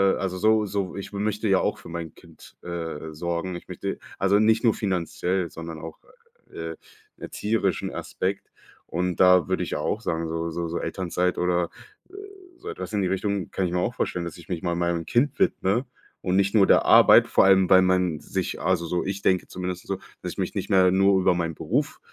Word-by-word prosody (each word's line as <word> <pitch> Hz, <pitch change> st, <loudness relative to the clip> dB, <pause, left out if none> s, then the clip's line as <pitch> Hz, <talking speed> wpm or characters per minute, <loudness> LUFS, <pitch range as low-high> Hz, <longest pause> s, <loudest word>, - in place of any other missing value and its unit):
äh, -, -, -6 dB
also, 95 Hz, -1 st, -2 dB
so 110 Hz, +2 st, +3 dB
so 100 Hz, -2 st, -3 dB
ich 100 Hz, -, -7 dB
möchte 105 Hz, +2 st, -1 dB
ja 95 Hz, -1 st, +4 dB
auch -, -, -1 dB
für -, -, -12 dB
mein 85 Hz, -2 st, -6 dB
Kind, -, -, -17 dB
äh, 80 Hz, -3 st, -5 dB
sorgen. 85 Hz, +3 st, -3 dB
Ich 85 Hz, -, -9 dB
möchte -, -, -5 dB, 0.2 s
also 100 Hz, +1 st, +3 dB
nicht 110 Hz, +1 st, +3 dB
nur 115 Hz, -3 st, +4 dB
finanziell, 90 Hz, -2 st, -2 dB
sondern 80 Hz, -1 st, -7 dB
auch, 80 Hz, +1 st, -9 dB, 0.5 s
äh, 80 Hz, 0 st, -5 dB, 0.4 s
erzieherischen 110 Hz, 0 st, -2 dB
Aspekt. 95 Hz, +1 st, -4 dB, 0.4 s
Und 90 Hz, +1 st, -2 dB
da 90 Hz, -3 st, +6 dB
würde -, -, 0 dB
ich -, -, -4 dB
auch 105 Hz, +8 st, -2 dB
sagen, 85 Hz, -5 st, -2 dB
so 80 Hz, +1 st, -3 dB
so 85 Hz, +1 st, -3 dB
so 85 Hz, -, -3 dB
Elternzeit 90 Hz, -1 st, -1 dB
oder, 90 Hz, -1 st, +1 dB, 0.4 s
äh, -, -, -23 dB, 0.4 s
so 395 Hz, +5 st, -8 dB
etwas 435 Hz, -, -6 dB
in 105 Hz, -, +1 dB
die 95 Hz, -, +1 dB
Richtung, 100 Hz, 0 st, -2 dB
kann 95 Hz, -, -1 dB
ich 90 Hz, -, -2 dB
mir 90 Hz, -, +1 dB
auch 115 Hz, +7 st, -1 dB
vorstellen, 90 Hz, -1 st, -2 dB
dass 85 Hz, -1 st, -7 dB
ich 85 Hz, -2 st, -14 dB
mich 90 Hz, -3 st, -3 dB
mal 85 Hz, -1 st, 0 dB
meinem 85 Hz, -1 st, -1 dB
Kind 125 Hz, -, +1 dB
widme 120 Hz, -, +1 dB, 0.4 s
und 90 Hz, 0 st, 0 dB
nicht 100 Hz, 0 st, +2 dB
nur 100 Hz, -3 st, +6 dB
der -, -, +5 dB
Arbeit, -, -, +7 dB
vor -, -, +4 dB
allem 95 Hz, -1 st, +5 dB
weil 95 Hz, -, +7 dB
man 90 Hz, -4 st, +1 dB
sich -, -, -4 dB
also 90 Hz, -1 st, +1 dB
so 85 Hz, +1 st, -1 dB
ich 95 Hz, +1 st, -3 dB
denke 95 Hz, -1 st, +2 dB
zumindest 90 Hz, 0 st, -5 dB
so, 95 Hz, -, -2 dB, 0.2 s
dass -, -, -5 dB
ich -, -, -19 dB
mich -, -, -2 dB
nicht -, -, -3 dB
mehr 95 Hz, -1 st, +5 dB
nur 95 Hz, +1 st, +4 dB
über 90 Hz, -, +4 dB
meinen 85 Hz, -2 st, -2 dB
Beruf, -, -, -2 dB
90 Hz, 210 wpm, -25 LUFS, 85-100 Hz, 0.5 s, Arbeit